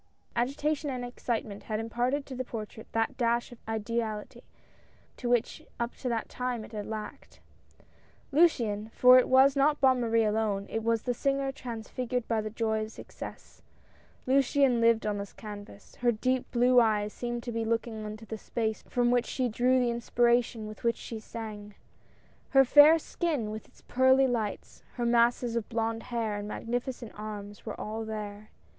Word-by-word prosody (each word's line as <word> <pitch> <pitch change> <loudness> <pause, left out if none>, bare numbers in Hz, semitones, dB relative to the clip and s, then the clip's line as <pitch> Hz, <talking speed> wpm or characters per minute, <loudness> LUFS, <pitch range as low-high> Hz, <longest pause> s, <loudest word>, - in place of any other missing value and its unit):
Agitation 285 +5 0
and 250 -2 -3
excitement 230 -4 -4
had 215 -1 -2
imparted 245 +5 -1
to 265 - -8
the 255 0 -3
portrait 220 -2 -7
that 225 0 0
dash 235 0 +1
of 240 - -12
ideality 220 -1 -3 0.8
which 240 -1 +1 0.2
up 235 0 -2
to 250 - -4
that 230 -2 -1
time 250 -3 -3
it - - -15
had 210 -2 -5
lacked. 215 -1 -7 0.9
Luciane 230 -10 +3
— - - -31
for 255 0 +8
it - - 0
was 265 +2 +6
not 290 +2 +3
Bonne 260 -2 +4
Marie 230 -1 +2
alone, 210 -2 0
it 225 - -1
was 230 -1 +1
the 245 - 0
singer 275 +2 0
transfigured 245 0 -4
by 225 -2 +1
the 215 - -4
joy 220 0 -1
of 215 0 -5
success - - -10 0.3
— - - -31
Luciane 270 -2 +3
lived 230 -1 +4
on 205 -1 -1
this 200 -1 -7
canvas; 205 -1 -10
her 240 -1 +3
deep 255 +3 -1
blue 250 +1 +5
eyes 210 -2 +1
seemed 240 -1 -4
to 240 - -4
be 230 0 -1
looking 225 -1 -2
into 215 +1 -6
space 220 0 -2
from 245 -1 +2
which 245 -1 +2
she 255 -2 -1
drew 250 +3 +2
the 245 -1 +2
inspiration 235 -1 +1
with 215 - -10
which 235 0 +2
she 225 - -7
sang; 210 -2 -8 0.7
her 270 -1 +6
fair 295 +5 +8
skin 305 -9 -2
with 220 0 -7
its - - -23
pearly 260 +1 +4
lights, 230 -5 -3
her 240 - -1
masses 235 0 +3
of 230 -2 -2
blonde 225 0 -1
hair 225 -4 -1
and 205 0 -5
magnificent 240 +1 -4
arms 210 0 -8
were 215 - -5
all 220 +1 -4
there. 215 -1 -6
235 Hz, 175 wpm, -29 LUFS, 220-250 Hz, 0.9 s, for